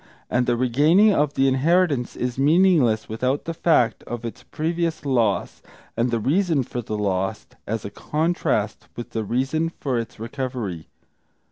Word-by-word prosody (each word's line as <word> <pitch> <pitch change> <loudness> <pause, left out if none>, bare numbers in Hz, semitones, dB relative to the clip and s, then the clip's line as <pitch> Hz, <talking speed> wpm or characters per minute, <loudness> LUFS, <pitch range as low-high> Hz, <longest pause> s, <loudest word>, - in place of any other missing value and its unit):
And 125 0 +1
the 120 -1 +2
regaining 150 - +4
of 145 -4 +1
the 135 0 +3
inheritance 140 -1 +2
is 125 +1 -3
meaningless 150 - +3
without 130 +5 -1
the 165 - -3
fact 160 -8 +2
of 120 0 -6
its 115 - -6
previous 165 0 -2
loss, 115 -9 0 0.3
and 120 +2 +1
the 115 -1 0
reason 160 - +1
for 120 0 -5
the 110 -1 -4
loss, 95 -2 -1 0.2
as 110 +2 -3
a 100 - -5
contrast 150 - -1
with 120 - -7
the 110 - -2
reason 135 +9 0
for 130 -4 -1
its 115 -1 -7
recovery. 115 - -4
130 Hz, 155 wpm, -23 LUFS, 115-155 Hz, 0.3 s, regaining